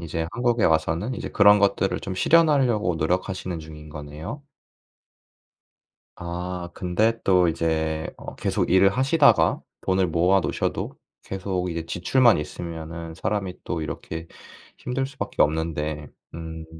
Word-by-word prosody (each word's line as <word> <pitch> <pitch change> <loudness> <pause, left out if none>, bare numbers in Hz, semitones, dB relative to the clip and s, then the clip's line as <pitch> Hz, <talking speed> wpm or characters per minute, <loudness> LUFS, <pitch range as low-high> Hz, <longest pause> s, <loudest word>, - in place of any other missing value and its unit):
이제 80 -1 -3
한국에 120 -1 +1
와서는 80 +8 +1
이제 - - -5
그런 105 0 +6
것들을 100 -1 +1
좀 95 - -5
실현하려고 130 - +3
노력하시는 90 +2 -2
중인 75 -1 -10
거네요. 75 - -8 1.7
아 85 +1 -5
근데 110 +6 0
또 90 -2 +4
이제 80 -1 -1
어 - - -9
계속 - - -1
일을 95 +2 +6
하시다가 130 +2 +3 0.2
돈을 95 -1 +1
모아 90 +4 +3
놓으셔도 - - -2 0.3
계속 95 -1 -3
이제 85 -1 -4
지출만 120 +8 +3
있으면은 80 +1 -6
사람이 95 +1 -3
또 80 - -3
이렇게 80 +2 -6 0.5
힘들 130 +2 -2
수밖에 135 - -3
없는데 75 -1 -1 0.3
음 80 -1 -7
90 Hz, 290 characters per minute, -24 LUFS, 80-100 Hz, 1.7 s, 그런